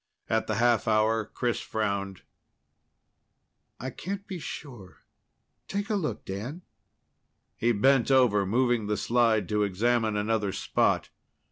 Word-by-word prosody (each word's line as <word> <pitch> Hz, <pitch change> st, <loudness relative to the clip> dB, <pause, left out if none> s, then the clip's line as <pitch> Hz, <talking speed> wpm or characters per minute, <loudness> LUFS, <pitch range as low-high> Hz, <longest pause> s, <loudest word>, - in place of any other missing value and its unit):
At 110 Hz, 0 st, +1 dB
the 110 Hz, -, -1 dB
half 120 Hz, +1 st, +2 dB
hour, 110 Hz, 0 st, +2 dB
Chris 120 Hz, +2 st, -2 dB
frowned. 100 Hz, -3 st, -3 dB, 1.6 s
"I 130 Hz, +2 st, -4 dB
can't 200 Hz, +8 st, -5 dB
be 190 Hz, -4 st, -6 dB
sure 125 Hz, -, -9 dB, 0.6 s
take 200 Hz, +2 st, -3 dB
a -, -, +2 dB
look, 175 Hz, -7 st, -3 dB
Dan." 120 Hz, -, -6 dB, 0.9 s
He 120 Hz, -, +1 dB
bent 130 Hz, +4 st, +3 dB
over, 125 Hz, -7 st, +4 dB
moving 120 Hz, +1 st, +1 dB
the 105 Hz, 0 st, 0 dB
slide 115 Hz, -3 st, +2 dB
to 105 Hz, -1 st, +1 dB
examine 110 Hz, +2 st, +1 dB
another 105 Hz, -2 st, 0 dB
spot. -, -, +1 dB
115 Hz, 125 wpm, -28 LUFS, 105-130 Hz, 1.6 s, over